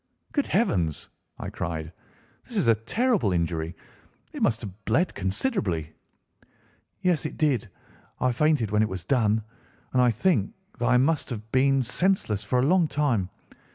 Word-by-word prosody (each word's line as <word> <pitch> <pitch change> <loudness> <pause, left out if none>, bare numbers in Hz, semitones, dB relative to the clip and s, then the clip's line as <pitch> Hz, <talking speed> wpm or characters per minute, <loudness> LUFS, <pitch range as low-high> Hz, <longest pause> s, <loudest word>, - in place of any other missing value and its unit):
"Good 285 - 0
heavens!" 90 - 0 0.3
I - - -6
cried, 80 -2 -4 0.5
"this - - -6
is - - +2
a 115 - +7
terrible 170 - +1
injury. 85 -1 -1 0.6
It - - -6
must 115 0 +2
have 105 -1 -9
bled 160 +11 +2
considerably." 95 - -1 1.1
"Yes, 180 -4 +2
it - - -10
did. 130 -8 +1 0.5
I 130 - +2
fainted 130 -4 +2
when 105 0 +3
it 110 - +1
was 95 -2 -5
done, 110 -1 +2 0.5
and 130 - +4
I 125 - +5
think 115 - +1 0.2
that 120 - +1
I 125 0 +5
must 145 +4 +1
have 110 -2 -6
been 135 0 +3
senseless 125 - 0
for 125 +5 0
a 125 - +3
long 175 +1 +4
time. 135 -11 0
115 Hz, 155 wpm, -26 LUFS, 100-150 Hz, 1.1 s, a